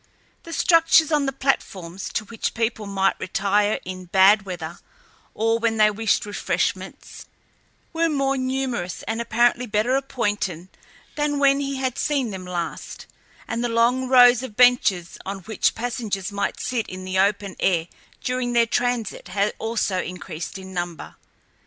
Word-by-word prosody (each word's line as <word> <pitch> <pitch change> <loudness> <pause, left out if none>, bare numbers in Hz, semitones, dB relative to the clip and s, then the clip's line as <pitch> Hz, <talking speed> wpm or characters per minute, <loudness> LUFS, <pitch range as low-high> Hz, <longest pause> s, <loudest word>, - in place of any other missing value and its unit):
The 335 - -9
structures 330 -2 +4
on 295 -2 +2
the - - 0
platforms, 195 -9 -2
to 215 - -2
which 230 +1 -4
people 225 -2 -1
might 195 -1 +1
retire 205 +2 +1
in 185 0 -7
bad 195 +3 +5
weather 175 -2 -6 0.6
or 225 +1 +1
when 225 -1 0
they 215 0 +5
wished 215 0 0
refreshments, 205 - -3 0.7
were 330 0 +1
more 275 -2 +1
numerous 255 -8 -2
and 225 +1 -3
apparently 240 +1 +2
better 215 +4 +1
appointed 205 -10 -2 0.4
than 295 -1 -1
when 275 0 +4
he 275 -1 -2
had 260 -2 -2
seen 275 -6 0
them 185 -2 -7
last, 175 -2 -5 0.4
and 230 +1 -2
the 240 - 0
long 240 +3 +2
rows 245 -2 +7
of 260 -5 -8
benches 245 -8 +3
on 195 0 -5
which 220 +4 0
passengers 225 -5 -3
might 200 0 -2
sit 250 -4 -2
in 185 0 -7
the 185 0 -1
open 200 0 +1
air 170 -3 +1 0.4
during 250 -1 -1
their 235 -1 +4
transit 240 -3 -1
had 200 +2 0
also 220 -4 -1
increased 180 -1 -6
in 190 0 -10
number. 175 -2 -5
225 Hz, 150 wpm, -23 LUFS, 190-250 Hz, 0.7 s, rows